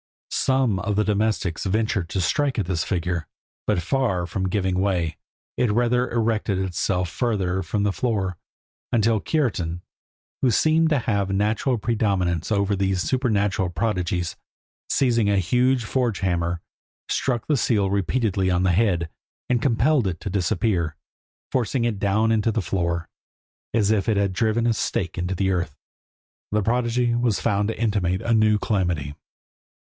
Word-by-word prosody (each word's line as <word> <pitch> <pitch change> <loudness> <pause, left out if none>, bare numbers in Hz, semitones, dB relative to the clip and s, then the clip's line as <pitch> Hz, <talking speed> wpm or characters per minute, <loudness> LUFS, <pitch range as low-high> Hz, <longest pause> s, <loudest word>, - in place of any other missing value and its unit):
Some 130 -7 +1
of 105 +2 -1
the 105 - +3
domestics 105 -4 0
ventured 100 -3 0
to 95 - -1
strike 135 +10 +1
at 105 - 0
this 85 -3 -1
figure, 85 -3 -2 0.4
but, 90 - +1
far 100 -5 0
from 95 +2 -2
giving 95 -2 0
way, 90 -5 0 0.4
it 125 - +2
rather 120 +3 +2
erected 110 -4 0
itself 90 0 -1
further 95 -2 -1
from 100 +1 -1
the 105 - +2
floor, 100 -6 -1 0.6
until 115 -1 +3
Kiartan, 90 - -1 0.6
who 130 - +3
seemed 160 +7 +3
to 150 - +3
have 105 -6 0
a - - -1
natural 110 +5 +1
predominance 100 -6 0
over 100 -1 +2
these 95 -2 0
supernatural 105 -8 +1
prodigies, 90 -2 -1 0.5
seizing 120 -6 +2
a 100 - +3
huge 125 +7 +2
forge 120 -2 -1
hammer, 85 -2 0 0.5
struck 120 -4 -1
the 150 - +2
seal 105 -7 +1
repeatedly 100 -1 0
on 90 0 +2
the 95 - +3
head, 90 -4 +2 0.4
and 120 -2 +2
compelled 130 0 +2
it 85 -3 -3
to 100 - -4
disappear, 90 -3 0 0.6
forcing 125 0 0
it 110 -4 -1
down 110 +3 +2
into 110 0 +2
the 110 -2 -1
floor, 85 -3 -1 0.6
as 105 -2 +2
if 105 -3 +1
he 110 - +2
had 100 -1 +1
driven 110 +3 +1
a 120 - +3
stake 95 -4 -2
into 90 +2 -2
the 95 +1 +1
earth. 85 -6 -2 0.8
This 105 0 +1
prodigy 120 +1 +1
was 120 -3 +1
found 100 -2 +1
to 115 - -4
intimate 100 -5 0
a 115 - +1
new 110 -1 +4
calamity. 90 -10 -1
100 Hz, 155 wpm, -23 LUFS, 90-115 Hz, 0.8 s, new